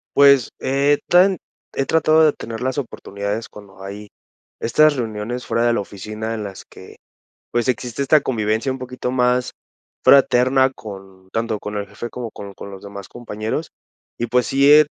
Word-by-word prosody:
Pues, 140 -3 +6
he 140 +2 +2
tan 185 +1 +5 0.4
he 135 - 0
tratado 160 +1 +4
de 150 - +4
tener 115 0 -7
las 130 +2 -1
oportunidades 105 -3 -4
cuando 100 -2 -14
hay 100 +2 -8 0.5
estas 155 +5 +4
reuniones 115 0 -4
fuera 115 +1 +1
de 120 - +3
la 115 - 0
oficina, 110 +3 -6
en 110 -2 -4
las 95 -2 -8
que, - - -14 0.6
pues, 120 0 0
existe 125 0 -2
esta 145 +2 +4
convivencia 110 +1 0
un 130 - -5
poquito 125 0 -4
más, 125 0 +1 0.5
fraterna 130 0 +5
con 95 -4 -11
tanto 115 -2 -1
con 105 0 -6
el 100 -1 -4
jefe, 120 - -7
como 120 -2 -6
con 100 -1 -9
con 100 +1 -9
los 95 - -10
demás 100 -1 -9
compañeros. 115 +5 -4 0.5
Y 120 - -2
pues, 125 +1 +2
sí 140 +2 +4
he 150 0 +8
120 Hz, 170 wpm, -20 LUFS, 105-135 Hz, 0.6 s, he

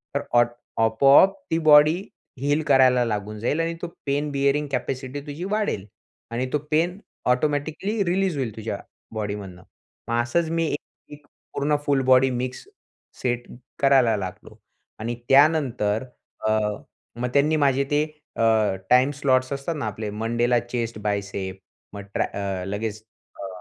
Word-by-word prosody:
तर - - +1
ऑट 120 0 +5 0.3
आपोआप 135 - +6 0.2
ती 165 - +2
बॉडी 155 +1 +6 0.4
हील 145 +2 +1
करायला 130 -3 +5
लागून 105 -1 -3
जाईल 145 +8 0
आणि 165 0 0
तो 175 - -3 0.2
पेन 145 +2 0
बियरिंग 140 +1 +1
कॅपॅसिटी 130 +2 -3
तुझी 150 +5 -6
वाढेल. 205 - -1 0.5
आणि 125 +2 -1
तो - - +4
पेन 170 +4 +1 0.3
ऑटोमॅटिकली 155 - 0
रिलीज 185 -2 0
होईल 115 -5 -3
तुझ्या 110 -2 -4 0.3
बॉडीमधनं." 100 -4 -5 0.5
मग 120 0 +2
असंच 160 +7 0
मी 165 0 0
एक 145 - -1 0.4
एक 145 0 -14 0.3
पूर्ण 145 +1 +1
फुल 140 -2 +2
बॉडी 130 0 +5
मिक्स 125 0 -4 0.6
सेट 120 -1 -1 0.3
करायला 130 -5 +4
लागलो 95 -2 -7 0.4
.आणि 115 +2 -3
त्यानंतर 135 -7 +3 0.4
अ, - - +2 0.7
मग 125 - 0
त्यांनी 150 +2 +3
माझे 140 -2 +3
ते 145 +1 +3 0.3
अ, - - -3 0.5
टाईम 130 +3 +5
स्लॉट्स 130 -2 +1
असतात 140 +4 -3
ना 140 - -3
आपले 105 0 -4
मंडेला 120 +3 +1
चेस्ट 120 -2 -4
बायसेप, 100 -2 -3 0.4
मग 100 - -6
ट्र - - +1 0.4
लगेच 105 +1 -3 0.4
अ, 100 - -4
130 Hz, 140 wpm, -24 LUFS, 115-150 Hz, 0.7 s, आपोआप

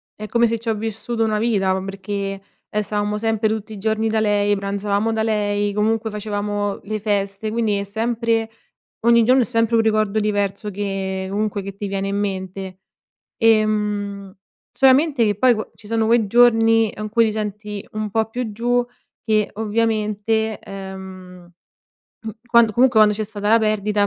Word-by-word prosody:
è 215 0 -7
come 235 +1 +3
se 230 0 -1
c'ho 225 0 -2
vissuto 225 +2 -3
una 215 -1 0
vita, 200 -5 +1
ma 190 0 -2
perché, 195 0 -4 0.3
ehm, 210 - -1
stavamo 210 0 -2
sempre 225 0 0
tutti 220 0 -3
i - - -8
giorni 220 +2 0
da 220 - +1
lei, 205 -1 +2
pranzavamo 200 +2 -1
da 220 0 0
lei, 205 -2 0
comunque 220 +1 0
facevamo 205 -1 -3
le 215 +1 -3
feste. 200 0 -2
Quindi, 220 -3 0
è 200 - -2
sempre 225 +2 -1 0.5
ogni 235 0 +5
giorno 255 +3 +4
è - - +2
sempre 230 +2 +1
un - - +5
ricordo 215 -1 +1
diverso 205 -1 -1
che 190 -1 -3
comunque, 205 0 -1
che 195 0 -8
ti 200 0 -5
viene 195 0 -2
in 200 - -1
mente. 190 -1 -4 0.6
Ehm, 210 -3 +1 0.4
solamente 270 -1 +4
che 205 -2 +1
poi 250 +4 +4
qua 215 -1 -5
ci 210 - -16
sono 225 0 +1
quei 230 -1 +3
giorni, 225 -1 +4
in 215 0 -4
cui 230 +1 +3
ti 220 - 0
senti 210 -1 -5
un 215 -1 -3
po' 220 +2 +1
più 240 -2 -4
giù, 245 +3 +1 0.4
che 215 -2 +1
ovviamente, 220 0 0
ehm, 190 -2 -10 0.7
mhmm, 220 -1 -5
quand 235 -2 +4
comunque 245 0 +4
quando 210 -1 +5
c'è 215 - -2
stata 205 0 -4
la 225 +1 +6
perdita, 210 -1 +1
215 Hz, 170 wpm, -21 LUFS, 200-225 Hz, 0.7 s, la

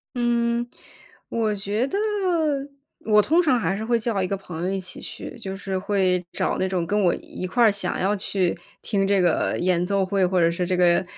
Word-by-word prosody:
嗯， 235 0 +1 0.6
我 220 -2 0
觉 205 +6 -1
得 390 - -2 1.0
我 210 -1 +3
通 320 +11 +4
常 265 -8 +2
还 195 - 0
是 215 - -4
会 235 +1 +2
叫 220 -3 -1
一 185 - 0
个 195 +1 -2
朋 175 -3 -8
友 185 - 0
一 195 - -1
起 185 -1 -6
去， - - -7
就 195 -3 -5
是 195 -1 -4
会 185 -2 +1
找 - - -1
那 185 - 0
种 180 -3 -1
跟 205 +2 +1
我 180 -3 +3
一 185 - -7
块 240 +6 +2
儿 220 - +6
想 200 - -2
要 195 +3 +1
去 190 -3 0 0.3
听 195 -2 0
这 200 -1 +3
个 175 -3 +1
演 180 -1 +1
奏 200 -1 +1
会， 195 0 +1
或 180 0 +2
者 170 -1 +4
是 175 +1 -2
这 185 - 0
个 175 0 +4
195 Hz, 230 characters per minute, -24 LUFS, 185-220 Hz, 1.0 s, 儿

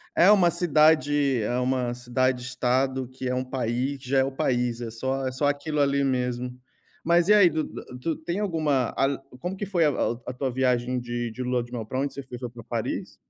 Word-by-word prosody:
É 185 +4 +6
uma 185 -5 +6
cidade 150 -5 +3
é 120 +4 -1
uma 125 -1 0
cidade-estado, 130 +1 0
que 130 0 -5
é - - 0
um 130 0 -1
país 130 +2 -2
que 130 -1 -11
já 135 - +3
é 130 - +4
o 135 - -2
país. 125 -3 0
É 115 - -4
só 130 +3 -2
é 130 - -2
só 145 +3 0
aquilo 145 +1 -1
ali 140 0 +2
mesmo. 125 -1 -1 0.5
Mas, 170 +2 +3
e 210 - +7
aí, 195 -4 +7
tu 155 0 -1
dá - - -8 0.2
tu 165 +5 -1
tem 170 +4 -4
alguma 155 - 0
al 135 0 +1 0.2
como 185 +2 -4
que 205 - -3
foi 175 -4 +1
a - - +5
a 125 - 0
a 125 - -3
tua 130 +1 -2
viagem 125 0 0
de 120 -1 -3
de 125 - -5
Lua 125 -1 0
de 120 - -15
Mel? 115 -3 -4
Pra 130 +4 -4
onde 140 +1 -1
você 140 - -6
foi? 125 -2 -9
Foi 125 -1 -5
pra 120 -1 -11
Paris? 115 -1 -4
130 Hz, 230 wpm, -26 LUFS, 125-145 Hz, 0.5 s, e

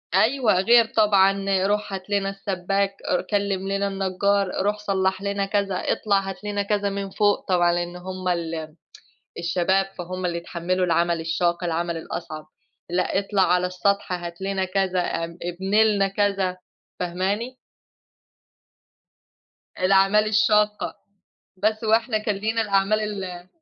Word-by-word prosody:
أيوَه، 230 +2 +3
غير 235 +2 +6
طبعًا، 195 -2 +4 0.2
روح 205 -1 -1
هات 190 +1 -6
لنا 200 -1 0
السباك، 195 0 -2 0.3
كلِم 200 -2 -1
لنا 200 0 0
النجار، 195 +1 0 0.2
روح 210 +1 +1
صلّح 190 -2 0
لنا 200 0 -1
كذا 200 -1 -1
اطلع 200 +2 +1
هات 195 +1 -6
لنا 205 -1 -1
كذا 205 0 0
من 200 0 -4
فوق، 205 +1 +1
طبعًا 175 -2 +3
لأن 175 0 -2
هُم 185 +1 -6
ال 165 -3 -2 0.6
الشباب 185 +3 +1
فهُم 180 +1 -4
اللي 170 -1 -2
يتحملوا 175 +2 -2
العمل 170 0 +1
الشاق 170 +2 0
العمل 170 0 -1
الأصعب، 160 -1 -6 0.4
لأ 180 +2 0
اطلع 200 -1 +1
على 180 0 +3
السطح 200 +2 0
هات 175 0 -5
لنا 195 0 -1
كذا 185 -1 0
أ 165 -1 -2 0.2
ابني 190 +5 +1
لنا 200 -3 +2
كذا 195 -2 0 0.4
فاهماني؟ 195 +8 -2 2.2
الأعمال 195 +3 +4
الشاقة، 210 -1 +2 0.6
بس 215 +3 0
هو 220 - +1
إحنا 225 -1 -1
كان 215 -1 -1
لينا 220 +3 0
الأعمال 200 0 +2 0.2
ال 180 -1 -8
195 Hz, 135 wpm, -24 LUFS, 180-205 Hz, 2.2 s, غير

